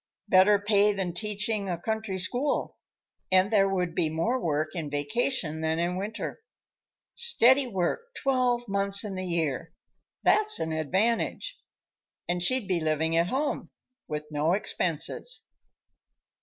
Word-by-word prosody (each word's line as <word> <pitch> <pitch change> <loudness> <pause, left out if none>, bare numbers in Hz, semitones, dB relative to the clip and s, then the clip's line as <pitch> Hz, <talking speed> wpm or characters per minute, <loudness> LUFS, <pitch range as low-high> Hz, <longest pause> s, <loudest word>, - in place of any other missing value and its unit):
Better 190 +2 +6
pay 205 0 +3
than 190 -3 -3
teaching 210 +1 -2
a 175 - -1
country 220 0 -3
school, 245 +10 -1 0.6
and 190 +3 +4
there 195 -2 +4
would 180 -3 -1
be 160 - +1
more 195 +12 0
work 155 -2 0
in 165 -5 -4
vacation 160 - -1
than 160 0 0
in 175 +1 -1
winter. 205 - -5 0.7
Steady 275 - +4
work 190 - -1
twelve 250 -3 +1
months 200 0 +2
in 210 -2 -5
the 185 0 -4
year; 165 -3 -2 0.5
that's 430 0 +3
an 160 - -2
advantage. 195 - -1 0.7
And 175 0 -1
she'd 255 +3 +1
be 185 -3 +1
living 160 +1 0
at 170 +1 +3
home, 275 +8 -2 0.4
with 150 0 -4
no 150 +3 +1
expenses." 180 - -1
190 Hz, 135 wpm, -27 LUFS, 165-225 Hz, 0.7 s, Better